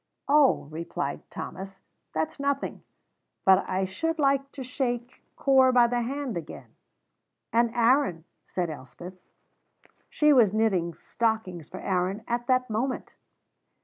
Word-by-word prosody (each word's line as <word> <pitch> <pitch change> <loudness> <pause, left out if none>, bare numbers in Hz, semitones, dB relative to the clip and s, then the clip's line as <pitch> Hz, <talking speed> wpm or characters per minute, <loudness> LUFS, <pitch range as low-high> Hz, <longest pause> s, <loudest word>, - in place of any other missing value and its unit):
"Oh," 285 - +4
replied 160 -3 -4
Thomas, 195 +1 -7 0.3
"that's 160 - -3
nothing. 280 0 -2 0.6
But 190 0 +5
I 190 +1 0
should 325 - -2
like 275 -1 +1
to 270 - -6
shake 245 -1 -3
Corp 260 -2 +4
by 240 -1 +7
the 240 0 0
hand 270 0 -3
again." 170 -2 -8 0.8
"And 235 0 +4
Aaron," 235 - +3 0.2
said 175 -3 -2
Elspeth. 155 +6 -10 1.0
She 300 -1 +4
was 225 -7 +5
knitting 190 -7 +1
stockings 220 -8 -2
for 185 - -8
Aaron 190 +3 -1
at 240 0 -2
that 255 -1 +2
moment. 245 +4 -3
235 Hz, 125 wpm, -27 LUFS, 185-265 Hz, 1.0 s, by